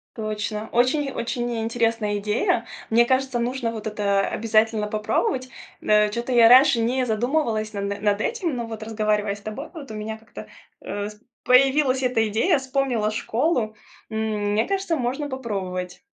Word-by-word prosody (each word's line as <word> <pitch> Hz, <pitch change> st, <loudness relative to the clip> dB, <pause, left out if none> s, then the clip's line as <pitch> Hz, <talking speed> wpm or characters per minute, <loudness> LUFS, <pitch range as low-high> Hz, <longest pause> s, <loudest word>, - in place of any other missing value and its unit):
Точно. 215 Hz, 0 st, -4 dB
Очень-очень 250 Hz, -1 st, 0 dB
ни 235 Hz, -1 st, -2 dB
интересная 225 Hz, -2 st, 0 dB
идея. 215 Hz, -, 0 dB, 0.3 s
Мне 235 Hz, +1 st, +6 dB
кажется, 260 Hz, 0 st, 0 dB
нужно 240 Hz, 0 st, -1 dB
вот 220 Hz, -1 st, -6 dB
это 205 Hz, -2 st, +1 dB
обязательно 220 Hz, +1 st, +1 dB
попробовать. 215 Hz, +4 st, -1 dB, 0.3 s
М, -, -, -8 dB
э, 210 Hz, 0 st, +5 dB
чё-то 235 Hz, +4 st, -3 dB
я 235 Hz, -2 st, +7 dB
раньше 255 Hz, +1 st, +7 dB
не 250 Hz, +3 st, +1 dB
задумывалась 225 Hz, -2 st, 0 dB
на 200 Hz, -, -3 dB
над 200 Hz, +1 st, 0 dB
этим, 360 Hz, -, -1 dB
но 235 Hz, -1 st, -4 dB
вот, 220 Hz, -1 st, -7 dB
разговаривая 215 Hz, -2 st, 0 dB
с 205 Hz, -, -14 dB
тобой, 215 Hz, +9 st, -6 dB
вот 300 Hz, -5 st, -9 dB
у -, -, -7 dB
меня 215 Hz, +1 st, -5 dB
как-то, 220 Hz, -1 st, -11 dB, 0.3 s
э, 205 Hz, 0 st, -4 dB
с 210 Hz, 0 st, -15 dB, 0.2 s
появилась 265 Hz, +1 st, +4 dB
эта 245 Hz, -3 st, +2 dB
идея, 230 Hz, -, +2 dB
вспомнила 260 Hz, -5 st, 0 dB
школу. 230 Hz, 0 st, 0 dB, 0.3 s
М, 220 Hz, -, -4 dB, 0.4 s
мне 220 Hz, +2 st, +2 dB
кажется, 390 Hz, -3 st, 0 dB
можно 275 Hz, +2 st, -2 dB
попробовать. 190 Hz, -8 st, -4 dB
230 Hz, 160 wpm, -23 LUFS, 215-260 Hz, 0.4 s, я